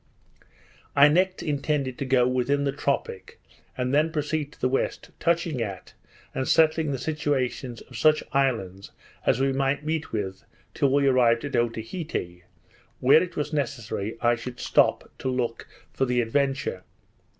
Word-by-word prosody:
I 145 +1 +8
next 185 +4 +1
intended 140 -3 -1
to 140 - -2
get 130 -2 +3
within 130 +3 +1
the 140 - +1
tropic, 135 -9 -3 0.4
and 125 +1 -1
then 155 +3 +3
proceed 150 -1 -2
to - - -21
the 130 - +2
west, 135 +1 -2
touching 165 -5 0
at, 100 -4 -5 0.4
and 130 - -2
settling 160 -1 +3
the 135 - -1
situations 130 -4 -2
of 125 - -14
such 155 +7 +3
islands 110 -9 -1 0.4
as - - +3
we 135 0 +2
might 135 +2 0
meet 160 0 -2
with 95 -2 -4 0.3
till 140 -4 +1
we 140 0 +3
arrived 125 -2 +3
at 140 - -4
Otaheite, 115 - -3 0.5
where 135 +5 +6
it 180 -2 -4
was 150 +1 -3
necessary 120 -6 -3
I 120 0 +4
should 120 +1 -6
stop - - +2
to 130 - -2
look 125 -2 -2 0.3
for 135 - +1
the 125 -1 +1
Adventure. 135 -4 0
135 Hz, 155 wpm, -26 LUFS, 120-150 Hz, 0.5 s, I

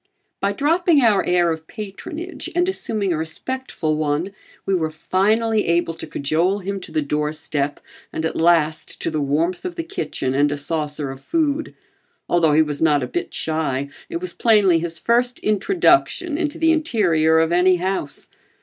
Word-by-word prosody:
By 200 - +1
dropping 310 - +2
our 210 -4 +4
air 175 -1 +2
of 160 0 -5
patronage 315 - -7
and 355 +1 +2
assuming 215 - -1
a - - -1
respectful 160 0 -3
one, 155 +5 -1 0.3
we 195 - 0
were 160 -4 +1
finally 210 +7 +1
able 170 0 +1
to - - -8
cajole 165 +7 0
him 200 0 -4
to 185 - -9
the 155 - 0
doorstep 150 -1 -2 0.3
and 160 - -3
at - - -2
last 160 -2 +2
to - - -1
the 155 -1 -1
warmth 160 +6 0
of 360 -1 -5
the 335 - -3
kitchen 150 - -3
and 145 +2 +2
a 145 - -2
saucer 150 -1 -2
of 135 0 -10
food. 315 - -1 0.5
Although 165 -3 +3
he 155 +1 +5
was 145 -2 -4
not 150 -4 +3
a - - -3
bit 125 - -4
shy, 145 -4 -2 0.2
it 340 - -3
was 365 +1 -6
plainly 205 -7 +4
his 165 0 -4
first 245 +5 +1
introduction 340 - +2
into 305 -2 -2
the 325 0 +3
interior 185 - +2
of 160 +1 +2
any 180 +1 +4
house. 180 -5 -3
175 Hz, 175 wpm, -21 LUFS, 155-235 Hz, 0.5 s, he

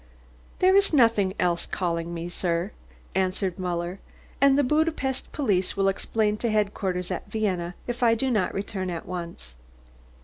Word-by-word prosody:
"There 375 +1 +5
is 400 -3 +4
nothing 225 -8 +4
else 175 -1 +1
calling 170 -2 -2
me, 170 0 -4
sir," 175 +1 -1 0.4
answered 185 -1 0
Muller. 175 +1 -2 0.4
"And 275 0 +6
the 290 - +4
Budapest 300 -2 0
police 200 -12 0
will 195 0 +3
explain 210 +2 0
to 235 - -1
headquarters 195 -4 -1
at - - -4
Vienna 180 -5 -1
if 240 0 -4
I 230 -2 +5
do 260 +3 0
not 210 -6 +1
return 195 -1 -3
at 170 -2 -4
once." 170 - -7
195 Hz, 150 wpm, -26 LUFS, 180-235 Hz, 0.4 s, And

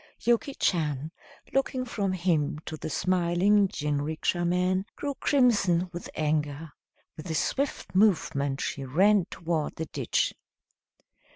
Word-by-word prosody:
Yuki 240 +4 +1
Chan, 155 -4 0 0.4
looking 265 -1 0
from 200 -5 -2
him 165 -4 0
to 155 - -5
the 155 - -6
smiling 185 +4 +2
jinrikisha 150 +2 -1
man, 180 +2 +1
grew 285 -1 -3
crimson 205 - +2
with 175 - -7
anger. 150 0 -1 0.5
With 160 +3 -8
a 160 - -1
swift 275 - -1
movement 145 -9 +2
she 140 - -3
ran 190 +8 +3
toward 165 -3 -2
the 160 - -4
ditch. - - -1
175 Hz, 120 wpm, -27 LUFS, 155-200 Hz, 0.5 s, ran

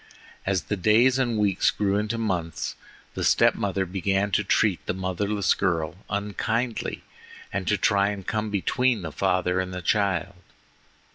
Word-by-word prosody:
As 95 -3 +1
the 105 - -2
days 115 +7 +4
and 120 -4 0
weeks 100 -3 +2
grew 100 -1 0
into 105 +2 -1
months, 90 -8 -2 0.4
the - - -3
step - - +4
mother 95 -1 -1
began 95 +2 0
to 105 - +2
treat 100 -1 +1
the 90 - -1
motherless 95 +2 0
girl 80 -5 -1
unkindly 110 +4 -2 0.5
and 95 -1 -2
to 105 - +2
try 100 +1 +3
and 100 -2 -5
come 110 -1 -2
between 110 +2 +1
the 80 - -5
father 90 +1 +1
and 90 -1 -4
child. 95 -3 0
100 Hz, 150 wpm, -25 LUFS, 90-105 Hz, 0.5 s, days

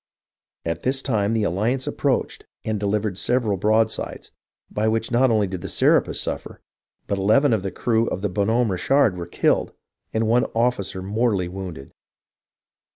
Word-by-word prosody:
At 85 0 -2
this 130 +1 0
time 110 -4 +1
the 110 -2 +1
Alliance 110 +8 0
approached - - -1 0.2
and 110 -1 -1
delivered 100 -1 -1
several 120 -5 +1
broadsides, 110 +4 0 0.4
by 105 +1 0
which 110 +1 0
not 125 +2 +4
only 110 -3 +3
did 95 -2 -5
the - - -5
Serapis - - +2
suffer, - - -4 0.5
but 100 - -2
eleven 115 +7 +4
of 110 - +1
the 95 - -3
crew 115 +4 0
of 95 - -3
the 105 - -1
Bo7i 100 +1 0
Homme 115 -1 +2
Richard 125 +3 +2
were 85 -2 -6
killed - - +1 0.4
and 110 0 0
one 120 +2 +3
officer 115 -6 0
mortally 100 -2 0
wounded. 90 -6 -7
105 Hz, 160 wpm, -23 LUFS, 95-115 Hz, 0.5 s, not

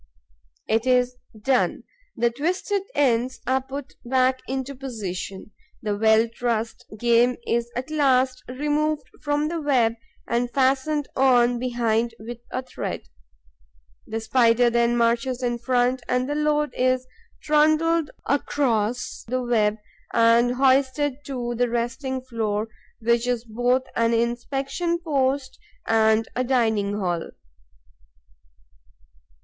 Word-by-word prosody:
It 225 +3 +1
is 250 0 +3 0.2
done; 255 +4 +1 0.3
the 235 +1 +2
twisted 365 - -1
ends 255 -2 +1
are 260 +1 +1
put 270 +1 -7
back 255 +1 +2
into 265 +1 -3
position. 210 -7 -6 0.3
The 210 -1 -1
well 220 +2 +4
trussed 230 -1 -3
game 240 +2 +3
is 235 0 0
at 255 +5 -4
last 260 -4 +2
removed 295 +3 -1 0.2
from 290 +1 0
the 335 -1 -3
web 250 -6 +2 0.3
and 240 +1 0
fastened 275 +3 +1
on 245 -2 +4
behind 235 -2 0
with 235 +2 -8
a 255 - -3
thread. 160 - -6 1.0
The 225 - -3
Spider 235 +1 +3
then 235 0 +2
marches 240 +2 +1
in 240 -1 -1
front 250 +1 +1
and 250 +1 +1
the 290 - -1
load 300 0 +1
is 255 0 +1 0.4
trundled 310 +1 +3 0.2
across 245 -5 0
the 255 +2 -1
web 215 -3 +2 0.4
and 235 +1 +4
hoisted 270 +1 +2
to 245 -3 -3
the 245 +1 0
resting 240 +3 -2
floor, 220 -3 -2 0.3
which 235 +1 +2
is 245 -1 -1
both 245 +3 +1
an 230 0 +2
inspection 270 +8 -1
post 275 -5 -1 0.3
and 220 0 +3
a 255 - +1
dining 220 -5 +1
hall. 175 -4 -2
250 Hz, 120 wpm, -24 LUFS, 230-270 Hz, 1.0 s, well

